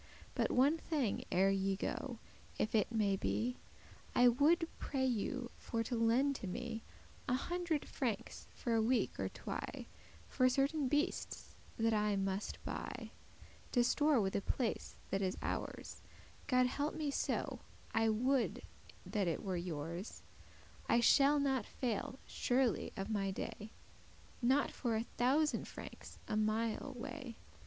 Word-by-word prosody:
But - - +1
one 280 +6 +4
thing 285 -12 -1
ere 190 +2 +4
ye 195 0 +1
go, 240 +5 -3 0.4
if 215 - 0
it 215 -1 +3
may 210 -4 +2
be; 240 +5 -1 0.6
I 245 0 +7
woulde 315 +7 +4
pray 265 -2 0
you 250 +1 -1
for 230 -1 -1
to 240 - -2
lend 240 +5 +3
to 200 - -6
me 230 +3 -4 0.5
A 250 - +3
hundred 345 +1 -1
frankes, 235 -7 -3
for 235 - -1
a 225 - +4
week 245 +3 +1
or - - 0
twy, - - -5 0.4
For 255 -1 +3
certain 275 +2 +2
beastes 295 +3 -1 0.2
that 225 -1 +2
I 210 -1 +2
muste 195 +1 -1
buy, - - -5 0.6
To 245 - +5
store 290 +2 +4
with 190 -2 0
a 200 - +1
place 235 +2 -2 0.2
that 195 - +1
is 190 0 0
ours - - -4 0.5
(God 255 0 +4
help 285 +4 -1
me 300 -2 -1
so, - - -1 0.3
I 225 0 +3
would 250 +4 +1 0.4
that 205 -4 0
it 165 - -1
were 190 -3 -1
yours); 170 +2 -4 0.7
I 235 - +5
shall 280 +4 +6
not 270 -5 +1
faile 245 +1 -2
surely 250 -2 +1
of 195 - -2
my 200 -2 +1
day, 210 +2 -5 0.7
Not 265 +4 +3
for 235 -4 -1
a 220 +1 0
thousand 285 +5 +2
francs, - - -9
a - - -1
mile 220 +5 0
way. 245 -1 -6
240 Hz, 145 wpm, -36 LUFS, 210-270 Hz, 0.7 s, I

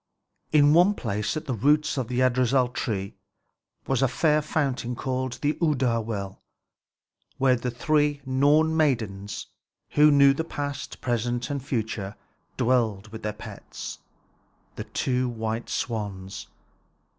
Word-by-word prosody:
In 145 -1 +6
one 180 +5 +5
place 105 - -2
at 155 - -5
the 135 - -2
roots 150 +6 +2
of 130 -4 -2
Yggdrasil 125 0 +2 1.1
was 135 -2 0
a 135 - +4
fair 150 +4 +2
fountain 135 -5 -1
called 130 0 -2
the 150 +1 +2
Urdar 130 -8 +2
well, 100 -3 -5 1.0
where 130 -1 +4
the 125 +1 -3
three 145 +4 +1
Norn 145 +4 +3
maidens, 110 -10 -1 0.5
who 150 +1 +6
knew 140 -1 +6
the 160 - -2
past, 145 -3 -5
present, 120 +1 -1
and 140 -2 -3
future, 110 -6 -3 0.4
dwelt 115 -5 +1
with 110 - -8
their 105 - -2
pets, 105 - -8 0.8
the - - -6
two 125 -1 -1
white 115 0 -3
swans. 100 -4 -4
130 Hz, 125 wpm, -26 LUFS, 115-145 Hz, 1.1 s, In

